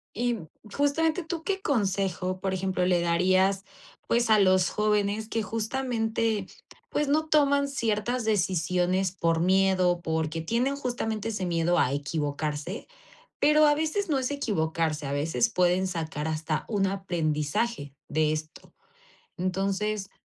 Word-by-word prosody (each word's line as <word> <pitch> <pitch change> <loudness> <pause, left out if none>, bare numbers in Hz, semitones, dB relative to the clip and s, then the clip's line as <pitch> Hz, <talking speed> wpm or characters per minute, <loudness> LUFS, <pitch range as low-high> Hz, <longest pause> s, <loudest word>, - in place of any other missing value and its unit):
Y, 240 +2 0
mm, 165 -7 -9 0.3
justamente, 320 +4 +1
¿tú 325 0 -5
qué 385 0 -2
consejo? 195 - -1
Por 190 0 -2
ejemplo, 185 -1 0
le 180 -1 +2
darías, 185 +3 +2 0.4
pues, 235 -1 +2
a 215 -1 +6
los 185 -1 +4
jóvenes 210 0 0
que 225 -1 -1
justamente, 225 -2 -1 0.4
pues, 295 - 0
no 310 +2 +1
toman 285 -2 +3
ciertas 235 -2 -1
decisiones 185 -2 +1
por 165 -3 0
miedo, 185 -1 +3
porque 160 0 -2
tienen 240 +10 0
justamente 225 -5 -3
ese 195 -4 -3
miedo 170 0 +1
a 125 - +3
equivocarse, 150 +4 -3 0.5
pero 300 +1 +5
a 295 - +5
veces 320 +6 -1
no 285 -4 +1
es 260 +1 -2
equivocarse, 160 - -1
a 140 - -3
veces 160 +10 +1
pueden 180 -2 +2
sacar 160 -4 -4
hasta 155 0 -2
un 200 -3 +1
aprendizaje 165 - -2
de 155 0 +1
esto. 155 0 -7 0.6
Entonces, 195 +2 -1
195 Hz, 135 wpm, -27 LUFS, 170-235 Hz, 0.6 s, a